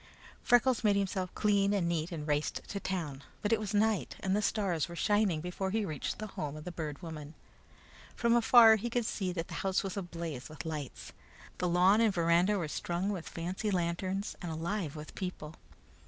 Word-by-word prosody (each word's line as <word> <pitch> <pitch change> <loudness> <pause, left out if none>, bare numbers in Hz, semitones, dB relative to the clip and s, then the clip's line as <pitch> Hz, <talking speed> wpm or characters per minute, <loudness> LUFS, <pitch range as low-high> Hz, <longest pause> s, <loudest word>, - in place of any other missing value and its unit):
Freckles 245 0 +3
made 205 -2 +4
himself 190 -2 -1
clean 200 -1 +3
and 180 -4 +1
neat, 170 +1 -1
and 155 -3 -5
raced 150 0 -1
to 200 - -3
town, 160 -9 -3 0.2
but 210 +2 +2
it 225 - +3
was 210 -2 -4
night 215 0 +1
and 190 0 +1
the 210 - +2
stars 190 -7 0
were 170 - -7
shining 205 -4 +2
before 180 +3 -3
he 215 +1 0
reached 155 -6 -3
the 215 - -5
home 150 0 -4
of 155 - -8
the 180 - -5
Bird 155 -4 -5
Woman. 155 -2 -7 0.8
From 235 -1 +2
afar 230 -1 +8
he 235 +3 -3
could 240 0 0
see 190 -4 -2
that 165 -1 -3
the - - -9
house 190 -1 +1
was 195 -2 -4
ablaze 170 -8 -5
with 155 +2 -8
lights. 150 -5 -6 0.5
The 180 - +1
lawn 185 +5 +5
and 225 -2 +4
veranda 175 +3 +3
were 170 -5 -2
strung 175 +5 -2
with 190 -5 -4
fancy 180 +5 -3
lanterns 185 +2 -1
and 175 -3 -4
alive 165 0 -3
with 150 0 -8
people. 165 -4 -6
185 Hz, 200 wpm, -32 LUFS, 165-205 Hz, 0.8 s, afar